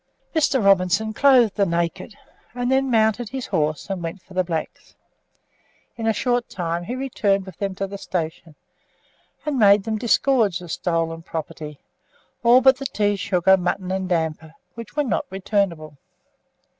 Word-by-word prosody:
Mr. 280 -7 +2
Robinson 195 +3 +3
clothed 250 -4 +5
the 200 - +3
naked, 170 +5 -2 0.4
and 245 +1 -1
then 265 0 +2
mounted 220 -1 +2
his 260 -1 -5
horse 155 -5 -1
and 195 -3 -4
went 165 +3 -5
for 190 - -16
the 185 0 +1
blacks. 165 -3 -5 1.0
In 225 -1 -3
a - - +4
short 245 +1 -1
time 170 -1 -3
he 245 - -4
returned 205 -7 0
with 190 - -11
them 195 -2 -2
to 195 - -2
the 200 +1 -8
station, 165 -3 -4 0.9
and 295 -4 -1
made 200 -2 +6
them 220 0 -2
disgorge 235 -4 +2
the 175 -1 -11
stolen 165 0 -2
property, 155 -2 -7 0.6
all 240 +2 +6
but 265 0 +5
the 275 0 -3
tea, 205 -3 0
sugar, 190 -1 +3
mutton, 180 +1 -2
and 190 -1 -2
damper, 160 -2 -2 0.2
which 230 +5 -10
were 295 - +2
not 245 - -1
returnable. 185 -7 -2
195 Hz, 160 wpm, -22 LUFS, 170-235 Hz, 1.0 s, made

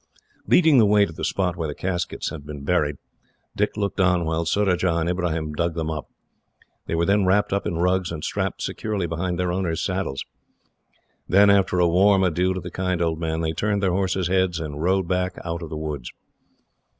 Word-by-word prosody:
Leading 160 -6 +5
the 110 - +5
way 105 0 +5
to 80 - -9
the 80 - -7
spot 90 -2 0
where 80 -3 -3
the 75 - -5
caskets 90 -1 -3
had 75 -3 -8
been 75 -1 -8
buried, 75 -2 +1 0.6
Dick 105 +1 -1
looked 100 -1 -2
on 90 -2 +3
while 80 +1 -1
Surajah 95 -3 +1
and 85 0 0
Ibrahim 85 -4 -1
dug 85 +2 -1
them 80 -1 -2
up. 75 -1 -5 0.8
They - - -1
were 85 +1 +1
then 100 0 +2
wrapped 100 +2 +2
up 100 - -1
in 85 - -2
rugs, 90 0 +1
and 75 -2 -6
strapped - - -2
securely 105 -4 -2
behind 85 +2 -2
their 90 0 0
owners' 90 -3 -1
saddles. 90 -8 -2 1.0
Then, 100 +2 +6
after 95 -2 +3
a 90 - +4
warm 95 +3 +4
adieu 90 +1 +1
to - - -2
the 90 - -8
kind 90 -1 -1
old 80 -2 0
man, 80 -1 -2
they 80 -1 0
turned 100 +4 -1
their 95 - +2
horses' 95 -1 0
heads, 95 -2 +1
and 75 -2 -5
rode 95 +1 +1
back 90 +1 -1
out 85 0 -3
of 85 - -6
the 80 - -5
woods. 75 -5 -5
90 Hz, 205 wpm, -23 LUFS, 80-95 Hz, 1.0 s, Then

